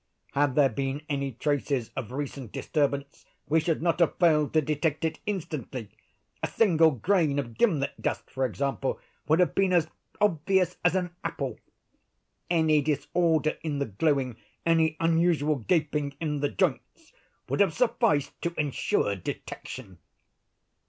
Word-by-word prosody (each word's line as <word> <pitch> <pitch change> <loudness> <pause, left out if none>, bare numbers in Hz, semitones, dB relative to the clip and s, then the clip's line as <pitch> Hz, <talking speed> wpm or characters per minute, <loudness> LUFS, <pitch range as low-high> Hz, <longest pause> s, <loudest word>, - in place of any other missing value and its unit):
Had 140 -2 +1
there 145 -2 +6
been 135 +4 -3
any 140 -2 -2
traces 140 -2 -1
of 120 -4 -5
recent 135 -3 -5
disturbance 140 -2 -1 0.2
we 160 +2 +3
should 160 0 -1
not 170 -1 +1
have 170 - +2
failed 155 -4 +3
to 160 - +5
detect 155 +1 -1
it 160 - -2
instantly. 150 - -4 0.5
A - - 0
single 165 -7 +4
grain 155 - +1
of 120 -5 -3
gimlet 150 - +1
dust, - - -2
for 130 - -2
example, 135 +2 -1 0.3
would 160 +3 +4
have 180 - +3
been 195 -1 +2
as 170 -3 +3 0.3
obvious 185 -1 +2
as 175 0 +3
an 180 -2 -1
apple. 135 -5 -3 0.9
Any 160 -3 +3
disorder 155 +2 +1
in 150 -3 -2
the 140 - 0
glueing—any 150 - 0
unusual 165 -2 +2
gaping 150 - 0
in 150 -3 -2
the 145 0 0
joints—would 305 - -4
have - - +3
sufficed 230 - +1
to 170 0 -2
insure 140 -8 0
detection." 95 +2 -7
150 Hz, 140 wpm, -27 LUFS, 140-170 Hz, 0.9 s, there